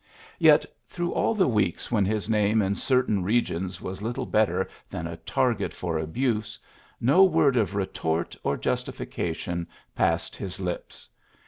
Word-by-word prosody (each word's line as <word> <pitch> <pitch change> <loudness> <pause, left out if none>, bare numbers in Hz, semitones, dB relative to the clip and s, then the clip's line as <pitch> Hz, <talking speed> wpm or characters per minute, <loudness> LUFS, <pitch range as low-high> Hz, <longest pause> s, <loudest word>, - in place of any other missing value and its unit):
Yet, - - +6 0.2
through 175 0 -3
all 225 - +1
the 195 - +3
weeks 105 -6 0
when 105 -4 +3
his 105 +1 -1
name 105 0 +2
in 95 +1 +1
certain 125 -3 +1
regions 95 -3 0
was 95 +1 -6
little 120 +4 -3
better 95 -5 +1 0.2
than 80 - -5
a 85 0 -5
target 115 +2 0
for 85 -3 -2
abuse, 105 +6 -1 0.4
no 140 +11 +5
word 145 -8 +4
of 105 -4 +1
retort 85 -4 -1
or - - 0
justification 85 0 -3 0.3
passed - - 0
his 95 -1 -6
lips. 90 -2 -5
105 Hz, 145 wpm, -26 LUFS, 90-120 Hz, 0.4 s, Yet